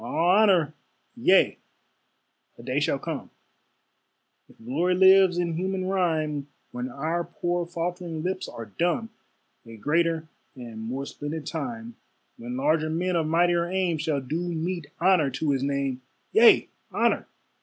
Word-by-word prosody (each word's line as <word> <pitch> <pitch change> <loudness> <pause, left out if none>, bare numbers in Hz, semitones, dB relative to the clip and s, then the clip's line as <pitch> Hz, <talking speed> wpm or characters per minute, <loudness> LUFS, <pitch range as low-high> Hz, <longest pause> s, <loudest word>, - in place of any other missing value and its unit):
All 120 - -5 0.2
honor! 190 -8 +4 0.4
yea, - - +3 1.0
a 115 - -12
day 130 +3 0
shall 145 -1 +1
come, 155 +1 -5 1.2
If - - -20
glory 160 +11 0
lives 190 -1 +6
in 175 -1 0
human 185 +2 -2
rhyme, 160 -6 0 0.2
When 125 +1 -4
our 160 +6 -2
poor 175 0 -2
faltering 170 -1 -4
lips 185 +1 -3
are 115 - -8
dumb; 175 - -1 0.5
A 115 -1 -12
greater 165 +5 0 0.3
and 120 -3 -9
more 125 +5 -4
splendid 145 +2 -6
time, 230 - -5 0.4
When 120 +2 -6
larger 155 +3 +1
men 175 +3 -1
of 160 -2 +1
mightier 170 +1 +2
aim 180 -3 0
Shall 150 -2 -1
do 150 +6 -3
meet 170 -1 -3
honor 175 -4 +4
to 140 +3 -1
his 135 -2 0
name. 140 -2 -1 0.3
Yea, - - +6 0.2
honor! - - +1
165 Hz, 140 wpm, -26 LUFS, 140-175 Hz, 1.2 s, lives